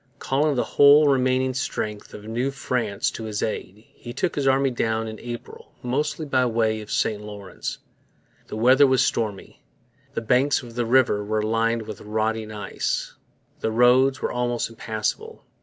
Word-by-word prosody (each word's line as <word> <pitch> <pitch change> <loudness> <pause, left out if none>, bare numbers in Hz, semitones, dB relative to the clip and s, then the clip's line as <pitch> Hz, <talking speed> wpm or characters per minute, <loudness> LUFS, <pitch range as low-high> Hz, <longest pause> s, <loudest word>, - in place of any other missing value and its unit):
Calling 145 +2 +1
the 125 - +1
whole 145 +1 +6
remaining 130 -1 +2
strength 105 -5 -4
of 105 - -10
New 120 +5 -2
France 125 -6 -1
to 115 - -7
his 105 -1 -3
aid, 105 0 -5
he 120 - -9
took 185 - -1
his 140 -2 -1
army 135 0 +3
down 115 -2 -1
in 110 -1 -7
April, 120 -1 -9
mostly 150 +5 -1
by 130 -3 +2
way 110 -2 0
of 105 - -10
the - - -5
St 105 -1 0
Lawrence. 105 -2 -7 0.7
The - - -6
weather 130 +5 +6
was 130 -2 +3
stormy. 105 -4 -3 0.5
The - - -1
banks 125 +5 +2
of 120 -1 -10
the 120 -1 -2
river 115 -4 +3
were 105 +1 -1
lined 115 +1 +1
with 110 -2 -8
rotting 110 +1 -2
ice. 105 -1 -3 0.5
The - - -1
roads 125 +4 +4
were - - 0
almost 120 -1 -1
impassable. 115 - -4
120 Hz, 170 wpm, -24 LUFS, 110-130 Hz, 0.7 s, whole